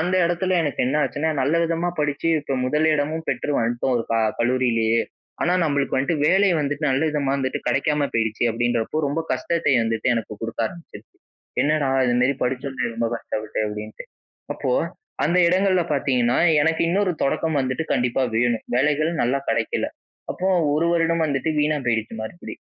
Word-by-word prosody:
அந்த 180 +3 0
இடத்துல 175 +2 0
எனக்கு 145 -4 -2
என்ன 135 +4 0
ஆச்சுன்னா, 160 +3 -2
நல்ல 140 +5 +1
விதமா 165 +1 -1
படிச்சு 150 +2 -1
இப்போ 140 -1 -3
முதல் 150 +4 +1
இடமும் 155 +2 -2
பெற்று - - -2
வந்துட்டோம், 120 +3 0
ஒரு - - -1
க - - +2 0.2
கல்லூரியிலேயே. 120 -2 +2 0.4
ஆனா, 175 - +2
நம்மளுக்கு 140 -3 0
வந்துட்டு 140 +5 0
வேலை 195 +3 +4
வந்துட்டு 145 +1 -2
நல்ல 130 +3 +1
விதமா 140 -2 -1
வந்துட்டு 130 -1 -2
கிடைக்காம 145 +1 +1
போயிருச்சு, 110 0 0
அப்பிடின்றப்போ 120 +5 -1
ரொம்ப 145 +4 -1
கஷ்டத்தை 170 -4 0
வந்துட்டு 115 +1 -1
எனக்கு 110 -2 -4
கொடுக்க 115 0 -2
ஆரம்பிச்சிது. 110 -8 -11 0.6
என்னடா, 150 -1 +1 0.2
இதுமாரி 125 +3 +2
படிச்சோமோ 130 0 -2
ரொம்ப 115 0 -1
கஷ்டப்பட்டு, 110 -1 -5
அப்பிடின்னுட்டு, 105 +1 -7 0.5
அப்போ - - -2 0.5
அந்த 175 +3 +2
இடங்கள்ல 185 0 +2
பார்த்தீங்கன்னா, 125 -3 +1 0.2
எனக்கு 160 +1 +1
இன்னொரு 190 -1 +1
தொடக்கம் 155 +2 0
வந்துட்டு 130 +5 -2
கண்டிப்பா 125 +2 0
வேணும். 120 -1 +1
வேலைகள் 150 +4 +2
நல்லா 130 +3 +1
கிடைக்கல. 115 0 -1 0.4
அப்போ 190 +1 -2 0.3
1 160 +2 +1
வருடம் 165 -1 +2
வந்துட்டு 145 +2 -1
வீணா 150 0 +1
போயிடுச்சு 115 -2 -1
மறுபடி. 140 +11 -8
140 Hz, 155 wpm, -22 LUFS, 120-160 Hz, 0.6 s, வேலை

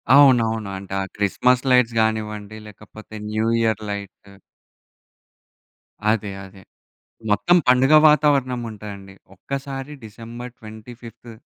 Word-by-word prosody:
అవునవును. 115 -7 +4
అంటే 95 0 -9
ఆ - - -2
క్రిస్మస్ 125 +5 +1
లైట్స్ 120 -2 +3
కానివ్వండి, 110 -1 -3
లేకపోతే 105 +1 -13 0.2
న్యూయర్ 110 0 0
లైటు 100 0 -8 1.8
అదే, 105 -2 -2
అదే. 95 0 -15 0.7
మొత్తం 175 +12 +3
పండుగ 130 +4 +4
వాతావరణం 140 -5 +2
ఉంటాయండి. 100 -2 -10 0.2
ఒక్కసారి 135 +5 -6
డిసెంబర్ 115 +3 -10
25థ్ 115 +1 -12
110 Hz, 95 wpm, -21 LUFS, 105-125 Hz, 1.8 s, అవునవును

